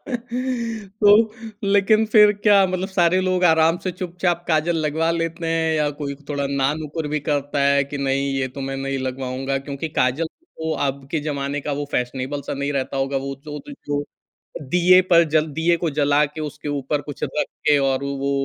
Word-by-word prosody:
तो 230 -5 0 0.5
लेकिन 205 +2 +4
फिर 210 -1 +8
क्या 205 -1 +4
मतलब 185 +1 -2
सारे 185 -1 +3
लोग 185 -1 +1
आराम 160 0 +4
से 185 - 0
चुपचाप 175 -1 -2
काजल 160 +1 +2
लगवा 160 +1 0
लेते 165 0 -2
हैं? 165 -1 +1
या 150 -1 +1
कोई 140 -1 -3
थोड़ा 140 -1 -1
ना-नुकुर 150 +3 -1
भी 150 - 0
करता 145 0 0
है 140 0 +3
कि 140 +1 -6
नहीं 140 0 0
ये 130 -1 -1
तो - - -4
मैं 135 - -3
नहीं 135 0 -2
लगवाऊँगा? 130 +1 -3
क्योंकि 140 +3 -5
काजल 130 +6 +1
तो 160 - -6
अब 135 0 -4
के 160 - 0
जमाने 145 -1 -3
का 145 - -3
वो 145 - -2
फ़ैशनेबल 130 +3 -2
सा - - -1
नहीं 140 +1 -2
रहता 135 0 -2
होगा। 135 +1 -1
वो 135 0 -3
जो 150 -1 -6
द 285 - -7
जो 145 0 -1 0.7
दीये 180 +1 +6
पर 170 -2 +5
जल 155 +1 +2
दीये 165 +3 +2
को 170 0 -2
जला 145 0 +3
के 155 +2 -9
उसके 150 0 -6
ऊपर 145 0 -1
कुछ 145 -1 -9
रख 150 - -2 0.2
के 150 -1 +6
और 135 0 0
वो 140 0 -2
150 Hz, 190 wpm, -22 LUFS, 140-175 Hz, 0.7 s, फिर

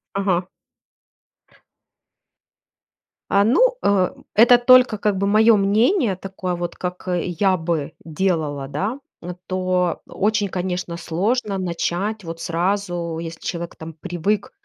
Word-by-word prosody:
Ага. 190 -2 0 2.9
А, 200 0 +5
ну, - - +3
э, 195 -3 +2 0.3
это 240 +3 +7
только, 250 -2 +5
как 205 -1 0
бы, 200 - 0
моё 215 +2 +5
мнение. 215 - +2
Такое 190 -1 -5
вот, 175 0 -4
как, 180 0 -6
э, 180 -2 0 0.2
я 190 -2 +4
бы 160 -3 -2
делала, 155 -4 -1
да. 200 - -3 0.2
Н 175 +1 -7
то 185 -1 0
очень, 210 0 0
конечно, 180 -2 -3
сложно 200 +6 -1
начать 185 +3 -2
вот 165 0 -7
сразу, 175 -1 -2
если 165 0 -7
человек 170 -1 -5
там 160 0 -8
привык, 185 +8 -2
185 Hz, 125 wpm, -21 LUFS, 170-205 Hz, 2.9 s, это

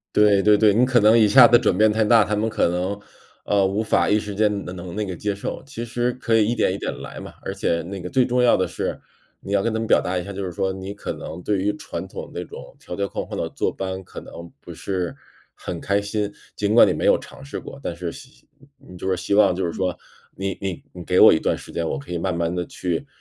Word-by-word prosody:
对 105 -2 +5
对 105 0 +5
对， 105 -2 +5
你 120 - +4
可 125 -1 +3
能 110 +2 +6
一 110 -2 +5
下 125 +3 +9
子 120 - +6
转 110 -6 +1
变 110 +2 +4
太 110 +1 +1
大， 110 -1 +5
他 105 - -2
们 110 +2 0
可 110 - +1
能， 90 +4 -2 0.4
呃， 100 -1 +2
无 100 +2 0
法 110 - +2
一 105 - +4
时 105 -1 -5
间 105 -1 +1
能 90 - -7
能 85 -1 -8
那 105 -1 -1
个 95 - -4
接 105 +4 -2
受， 100 - -5
其 135 -4 -6
实 120 +1 -1
可 120 -2 -1
以 110 -1 +3
一 120 - +1
点 105 - +1
一 - - -2
点 - - -3
来 - - -8
嘛， - - -9
而 - - -4
且 85 - 0
那 95 +3 -7
个 90 0 -6
最 130 -2 +3
重 125 0 +1
要 120 - +5
的 95 - 0
是， - - -4 0.4
你 100 - -7
要 100 -1 +3
跟 115 - 0
他 110 - -1
们 115 - -2
表 - - +4
达 90 0 -2
一 90 - -4
下， 100 - -7
就 100 0 -4
是 90 - -3
说 95 +2 -1
你 95 +1 -6
可 - - -5
能 80 - -8
对 105 -2 +1
于 100 +2 +1
传 - - -6
统 - - -8
那 - - -4
种 - - -11
条 90 - -7
条 100 - -1
框 - - -4
框 - - -5
的 - - -2
坐 - - -1
班， 95 0 -4
可 - - -10
能 85 0 -11
不 85 - -10
是 90 -1 -3 0.4
很 85 -2 -6
开 100 0 0
心， 105 0 -2 0.2
尽 105 +1 0
管 120 - +8
你 - - +2
没 - - -3
有 - - +6
尝 - - -12
试 140 - -6
过， 140 - -10
但 90 - -4
是 85 0 -4
希 130 - -15 0.3
你 90 -10 -14
就 95 - -4
是 95 - +1
希 95 +3 -2
望 100 -3 +5
就 95 +1 -2
是 85 - -2
说 90 -1 -2 0.4
你 95 0 -4
你 95 -3 -4
你 90 -1 -9
给 90 +1 +2
我 - - +9
一 - - +3
段 - - 0
时 - - -12
间， 85 -1 -2
我 - - -2
可 70 +5 -9
以 90 - -2
慢 90 0 -1
慢 85 0 -1
地 90 -1 -2
去 85 -3 -3
100 Hz, 305 characters per minute, -22 LUFS, 90-110 Hz, 0.4 s, 下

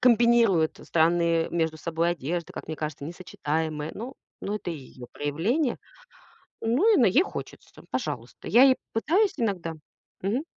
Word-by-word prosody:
комбинирует 235 -8 +4
странные 165 0 +2
между 160 -2 -1
собой 170 +2 0
одежды, 170 +1 -3
как - - -7
мне 160 - -4
кажется, 150 -2 -5
не 165 - -5
сочетаемые. 155 -3 -3 0.5
Ну 205 - -2
это 205 -4 -4
её 130 -5 -9
проявление. 205 - 0 0.9
Ну 285 - +3
и 395 - +5
на 245 - +5
ей 240 - +5
хочется, - - -9
пожалуйста, - - -4
я 245 - +7
ей 265 -1 +7 0.2
пытаюсь 365 - +2
иногда, 185 -8 -1 0.5
мгм. 215 +9 0
175 Hz, 140 wpm, -26 LUFS, 160-235 Hz, 0.9 s, я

